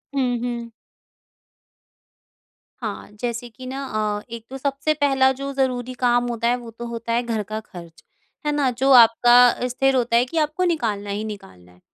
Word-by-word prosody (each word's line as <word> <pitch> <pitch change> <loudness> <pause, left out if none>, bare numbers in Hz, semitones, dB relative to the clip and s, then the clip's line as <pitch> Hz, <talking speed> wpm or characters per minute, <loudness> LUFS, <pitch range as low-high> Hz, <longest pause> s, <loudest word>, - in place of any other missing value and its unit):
हुँ, 250 -3 +1
हुँ। 235 -1 -4 2.1
हाँ, - - -5
जैसे 240 0 -4
कि 255 +3 -12
ना 270 +2 -5 0.4
अ, - - -11
एक 230 -1 -8
तो 270 - -6
सबसे 280 +3 -1
पहला 270 -3 +3
जो 275 0 -3
ज़रूरी 255 -2 -1
काम 245 -1 +2
होता 235 -1 -1
है 245 - +3
वो 235 -2 -10
तो 235 +2 -8
होता 230 0 -4
है 240 +1 +1
घर 225 -3 -2
का 215 +2 -5
खर्च, 170 -5 -13 0.4
है 295 - +1
ना? 290 -3 +1
जो 265 +3 +1
आपका 240 0 +7
अ, 250 - -2
स्थिर 270 +2 +1
होता 240 -2 +1
है 240 - +4
कि 320 +6 -6
आपको 305 +3 0
निकालना 210 -9 -3
ही 205 +2 -3
निकालना 90 - -13
है। 90 - -23
245 Hz, 185 wpm, -22 LUFS, 230-265 Hz, 2.1 s, आपका